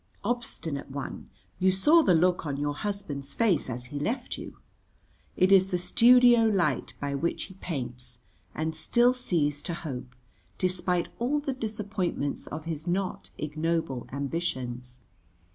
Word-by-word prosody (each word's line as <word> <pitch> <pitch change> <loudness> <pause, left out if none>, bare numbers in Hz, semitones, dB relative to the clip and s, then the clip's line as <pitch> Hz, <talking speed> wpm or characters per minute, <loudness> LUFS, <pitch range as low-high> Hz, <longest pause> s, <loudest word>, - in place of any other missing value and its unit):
Obstinate 200 - -3
one, 140 0 -6 0.3
you 185 +1 +4
saw 295 - +5
the 185 - +4
look 180 +2 +3
on 145 -3 -3
your 145 0 -1
husband's 145 -7 -4
face 190 -12 +2
as 125 0 -4
he 145 - -2
left 225 - -2
you. - - -9 0.8
It 185 +1 +4
is 190 -1 +6
the 180 - +1
studio 240 +4 +6
light 175 - +1
by 140 -1 -2
which 160 +5 -1
he 190 - -10
paints 125 -9 -6 0.4
and 160 +1 -2
still 240 +10 +3
sees 155 - 0
to 170 - -3
hope, 125 -6 -6 0.4
despite 180 -1 0
all 265 +5 +1
the 285 -2 -2
disappointments 205 - -3
of 160 - -6
his 160 0 -5
not 185 +1 -2
ignoble 155 -3 -2
ambitions. 130 -4 -3
170 Hz, 145 wpm, -28 LUFS, 140-200 Hz, 0.8 s, is